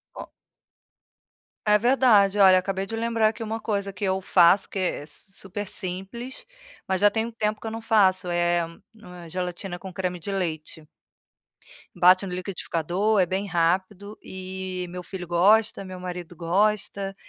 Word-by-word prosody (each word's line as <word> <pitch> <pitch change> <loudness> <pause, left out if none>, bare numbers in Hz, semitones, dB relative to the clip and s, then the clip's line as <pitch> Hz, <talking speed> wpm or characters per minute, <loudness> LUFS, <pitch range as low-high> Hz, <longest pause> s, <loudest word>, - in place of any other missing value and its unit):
O - - -8 1.4
É 210 - +6
verdade, 215 -4 +4
olha 190 -2 +7
acabei 195 +1 -3
de 225 - -5
lembrar 230 -1 +1
aqui 220 +1 -3
uma 225 +1 -4
coisa 200 -2 -2
que 195 +1 -4
eu 190 0 0
faço 185 +1 +4
que 195 - -4
é 185 -5 -1
s 150 +6 -14
super 195 +2 -7
simples, 195 - -6 0.4
mas 190 0 -1
já 205 0 +6
tem 220 0 -1
um 235 - -6
tempo 215 -1 -2
que - - -7
eu 220 - -4
não 225 - -6
faço, 190 -5 +3
eh, 175 0 +1 0.3
hum, 215 -5 -14
é - - -10
gelatina 180 +1 -4
com 190 +1 -9
creme 180 0 -3
de 175 +4 -6
leite. 160 -4 -4 1.1
Bate 185 +2 +5
no 180 - -5
liquidificador, 185 +2 -1
é 185 - +4
bem 190 +3 -2
rápido 185 +4 -1
e 185 -1 -6
meu 180 +1 -6
filho 180 0 -7
gosta, 200 +4 +3
meu 185 -1 -8
marido 180 -1 -7
gosta, 195 +3 0
190 Hz, 165 wpm, -25 LUFS, 180-210 Hz, 1.4 s, olha